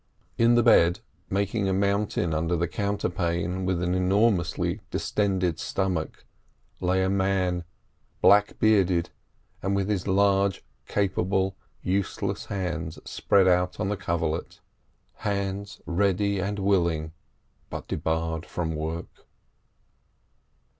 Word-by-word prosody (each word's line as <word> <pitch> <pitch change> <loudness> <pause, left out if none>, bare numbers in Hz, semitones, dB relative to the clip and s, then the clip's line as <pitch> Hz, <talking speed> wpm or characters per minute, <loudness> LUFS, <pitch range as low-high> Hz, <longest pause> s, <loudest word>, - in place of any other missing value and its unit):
In 115 +1 +4
the 120 - +4
bed, 85 +1 +5 0.3
making 100 +1 0
a - - +1
mountain 100 -3 0
under 80 +3 0
the 85 +1 0
counterpane 90 -2 -1
with 90 -2 0
an 90 0 0
enormously 95 -1 +1
distended 95 -6 0
stomach, 95 -5 -2 0.5
lay 95 +1 +1
a - - +1
man, 95 -2 0 0.5
black 105 0 +5
bearded, 95 -6 +3 0.5
and 95 +1 0
with 100 -1 0
his 100 -3 -1
large, 100 0 +2 0.2
capable, 95 -1 0 0.3
useless 100 +2 -1
hands 90 -5 -3
spread 100 -2 +2
out 90 0 +2
on 95 - 0
the 105 - 0
coverlet—hands 95 +3 -4
ready 100 +2 +1
and 100 +2 -2
willing, 85 -6 +1 0.6
but - - -6
debarred 80 0 -2
from 80 -2 -3
work. 80 +2 -6
95 Hz, 110 wpm, -26 LUFS, 85-100 Hz, 0.6 s, bed